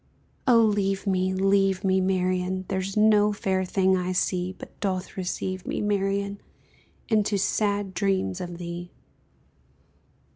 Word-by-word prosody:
Oh 235 Hz, -2 st, +6 dB
leave 200 Hz, -2 st, +1 dB
me, 185 Hz, -1 st, +1 dB
leave 195 Hz, 0 st, +2 dB
me, 190 Hz, -1 st, +2 dB
Marian, 185 Hz, 0 st, 0 dB
There's 190 Hz, +1 st, -2 dB
no 210 Hz, -1 st, +5 dB
fair 190 Hz, -2 st, -1 dB
thing 190 Hz, 0 st, +2 dB
I 185 Hz, 0 st, -1 dB
see 180 Hz, 0 st, 0 dB
But -, -, -13 dB
doth 190 Hz, -2 st, -2 dB
deceive 185 Hz, 0 st, -4 dB
me, -, -, -2 dB
Marian, 200 Hz, -1 st, -1 dB, 0.7 s
Into 210 Hz, -2 st, +2 dB
sad 205 Hz, 0 st, 0 dB
dreams 190 Hz, -, 0 dB
of 175 Hz, -1 st, -6 dB
thee! 175 Hz, 0 st, -6 dB
190 Hz, 125 wpm, -26 LUFS, 185-200 Hz, 0.7 s, Oh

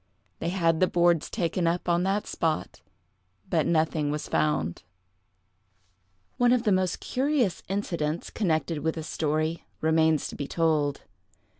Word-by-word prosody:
They 165 Hz, -, -2 dB
had 165 Hz, -3 st, +1 dB
the 185 Hz, -, +4 dB
boards 175 Hz, -3 st, +2 dB
taken 175 Hz, -3 st, -1 dB
up 170 Hz, +2 st, -1 dB
on 170 Hz, 0 st, +2 dB
that 195 Hz, +3 st, 0 dB
spot, 160 Hz, -2 st, -2 dB, 0.7 s
but 160 Hz, -3 st, +1 dB
nothing 155 Hz, -2 st, +1 dB
was 150 Hz, 0 st, -3 dB
found. 85 Hz, -, 0 dB, 1.6 s
One 245 Hz, 0 st, +4 dB
of 250 Hz, -2 st, +3 dB
the 215 Hz, -, +2 dB
most 185 Hz, -2 st, +1 dB
curious 260 Hz, -, 0 dB
incidents, 170 Hz, -5 st, -2 dB
connected 165 Hz, -5 st, 0 dB
with 160 Hz, +2 st, -1 dB
this 160 Hz, -1 st, -5 dB
story, 155 Hz, +1 st, -1 dB, 0.2 s
remains 160 Hz, -1 st, +2 dB
to -, -, -8 dB
be 140 Hz, -, -4 dB
told. 155 Hz, -4 st, 0 dB
165 Hz, 140 wpm, -27 LUFS, 155-185 Hz, 1.6 s, the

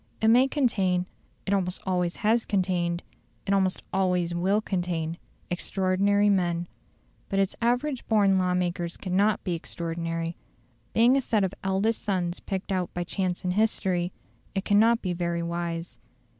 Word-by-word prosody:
It 220 Hz, -, +3 dB
may 250 Hz, +4 st, +6 dB
contain 195 Hz, -11 st, +1 dB, 0.4 s
it 200 Hz, -, 0 dB
almost 185 Hz, -2 st, 0 dB
always 180 Hz, -2 st, 0 dB
has 225 Hz, +2 st, +2 dB
contained, 180 Hz, -3 st, 0 dB, 0.4 s
it 200 Hz, -, +1 dB
almost 190 Hz, -1 st, +1 dB
always 180 Hz, -2 st, +1 dB
will 190 Hz, +4 st, +2 dB
contain 175 Hz, -5 st, -2 dB, 0.3 s
extraordinary 195 Hz, +3 st, +2 dB
men. 175 Hz, -3 st, +1 dB, 0.6 s
But 195 Hz, -, -1 dB
its 195 Hz, -1 st, +1 dB
average 245 Hz, +3 st, 0 dB
born 200 Hz, -3 st, +4 dB
law 180 Hz, -1 st, +1 dB
makers 175 Hz, -1 st, -2 dB
cannot 200 Hz, +3 st, +1 dB
be 180 Hz, -, -1 dB
extraordinary. 165 Hz, 0 st, -3 dB, 0.6 s
Being 235 Hz, +4 st, +5 dB
a -, -, +2 dB
set 220 Hz, -5 st, +1 dB
of 190 Hz, 0 st, -1 dB
eldest 195 Hz, +4 st, +1 dB
sons 180 Hz, -4 st, -1 dB
picked 195 Hz, -1 st, -4 dB
out 185 Hz, -2 st, -1 dB
by 175 Hz, -, -1 dB
chance 180 Hz, 0 st, -2 dB
and 180 Hz, -1 st, 0 dB
history, 185 Hz, -4 st, +1 dB, 0.4 s
it 195 Hz, -, -1 dB
cannot 225 Hz, +3 st, +4 dB
be 180 Hz, -2 st, -1 dB
very 170 Hz, -1 st, -1 dB
wise. 170 Hz, 0 st, -4 dB
185 Hz, 150 wpm, -27 LUFS, 175-205 Hz, 0.6 s, may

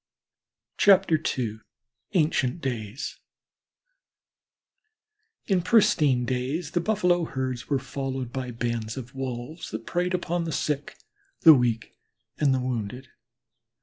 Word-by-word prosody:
II 155 Hz, -, +3 dB, 0.6 s
ANCIENT 155 Hz, -3 st, +2 dB
DAYS 120 Hz, -3 st, -4 dB, 2.3 s
In 190 Hz, -3 st, +2 dB
pristine 155 Hz, -, +4 dB
days 130 Hz, +6 st, -2 dB
the 175 Hz, -, +1 dB
Buffalo 180 Hz, -4 st, +2 dB
herds 130 Hz, -4 st, -4 dB
were 140 Hz, -, +2 dB
followed 130 Hz, -2 st, -4 dB
by 130 Hz, -1 st, -3 dB
bands 115 Hz, -1 st, -3 dB
of 130 Hz, +1 st, -7 dB
Wolves 130 Hz, +4 st, -5 dB
that 110 Hz, +1 st, -6 dB
preyed 180 Hz, +1 st, 0 dB
on 175 Hz, 0 st, -1 dB
the 165 Hz, -, -3 dB
sick, 145 Hz, 0 st, -2 dB, 0.4 s
the 160 Hz, -, +10 dB
weak, 120 Hz, -4 st, 0 dB, 0.4 s
and 145 Hz, -3 st, +3 dB
the 130 Hz, -, +2 dB
wounded. 125 Hz, 0 st, -4 dB
135 Hz, 110 wpm, -26 LUFS, 125-165 Hz, 2.3 s, the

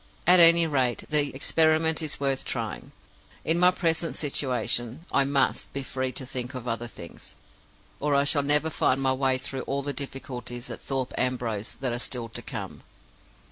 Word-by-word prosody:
At 180 Hz, +1 st, +6 dB
any 170 Hz, 0 st, +8 dB
rate, 130 Hz, -6 st, 0 dB
the 150 Hz, -1 st, +4 dB
experiment 160 Hz, +3 st, +2 dB
is 155 Hz, -2 st, -1 dB
worth 135 Hz, -1 st, 0 dB
trying. 115 Hz, -, -5 dB, 0.5 s
In 165 Hz, +2 st, +3 dB
my 180 Hz, 0 st, +7 dB
present 165 Hz, -2 st, -1 dB
situation 130 Hz, -1 st, -1 dB
I 140 Hz, -, +3 dB
must 140 Hz, -1 st, 0 dB
be 140 Hz, -, -2 dB
free 130 Hz, 0 st, -3 dB
to 130 Hz, -, -5 dB
think 125 Hz, 0 st, -5 dB
of 125 Hz, -1 st, -6 dB
other 115 Hz, 0 st, -3 dB
things, 85 Hz, -7 st, -12 dB, 0.6 s
or 145 Hz, 0 st, 0 dB
I 140 Hz, -, +4 dB
shall 145 Hz, +1 st, +3 dB
never 150 Hz, +3 st, +2 dB
find 135 Hz, -2 st, +1 dB
my 135 Hz, -1 st, +2 dB
way 130 Hz, 0 st, +2 dB
through 130 Hz, 0 st, -4 dB
all 140 Hz, 0 st, -1 dB
the 145 Hz, 0 st, -3 dB
difficulties 125 Hz, -3 st, -6 dB
at -, -, -8 dB
Thorpe 135 Hz, -2 st, -3 dB
Ambrose 120 Hz, -5 st, -2 dB
that 130 Hz, -3 st, 0 dB
are 120 Hz, -, -2 dB
still 120 Hz, -2 st, -4 dB
to -, -, -6 dB
come. -, -, -7 dB
135 Hz, 180 wpm, -26 LUFS, 125-150 Hz, 0.6 s, any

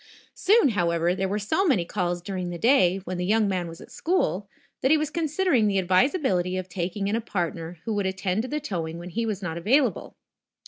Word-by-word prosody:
Soon, 395 Hz, -, +4 dB
however, 170 Hz, -4 st, +1 dB
there 190 Hz, +1 st, -1 dB
were 200 Hz, +2 st, -1 dB
so 265 Hz, -, 0 dB
many 260 Hz, -, +2 dB
calls 175 Hz, -2 st, -2 dB
during 185 Hz, -2 st, -4 dB
the 175 Hz, -, -5 dB
day, 195 Hz, -4 st, +4 dB
when 185 Hz, -1 st, -4 dB
the -, -, -1 dB
young 215 Hz, +1 st, +3 dB
man 185 Hz, -3 st, -1 dB
was 165 Hz, 0 st, -9 dB
at -, -, -13 dB
school, 210 Hz, -, -1 dB, 0.3 s
that 265 Hz, -, +2 dB
he 315 Hz, -, +6 dB
was 305 Hz, 0 st, -2 dB
considering 315 Hz, -, +1 dB
the 200 Hz, -1 st, +1 dB
advisability 185 Hz, -, +2 dB
of 185 Hz, -1 st, -4 dB
taking 185 Hz, +3 st, -3 dB
in 205 Hz, -, 0 dB
a 230 Hz, -, -1 dB
partner 175 Hz, -5 st, -3 dB
who 225 Hz, -, -1 dB
would 205 Hz, -2 st, 0 dB
attend 190 Hz, +1 st, -1 dB
to 250 Hz, -, -5 dB
the 300 Hz, +3 st, -2 dB
towing 170 Hz, -, -4 dB
when 175 Hz, +1 st, -8 dB
he 230 Hz, +4 st, -1 dB
was 205 Hz, -2 st, -3 dB
not 170 Hz, -1 st, -3 dB
available. 255 Hz, -, +1 dB
195 Hz, 220 wpm, -25 LUFS, 175-250 Hz, 0.3 s, he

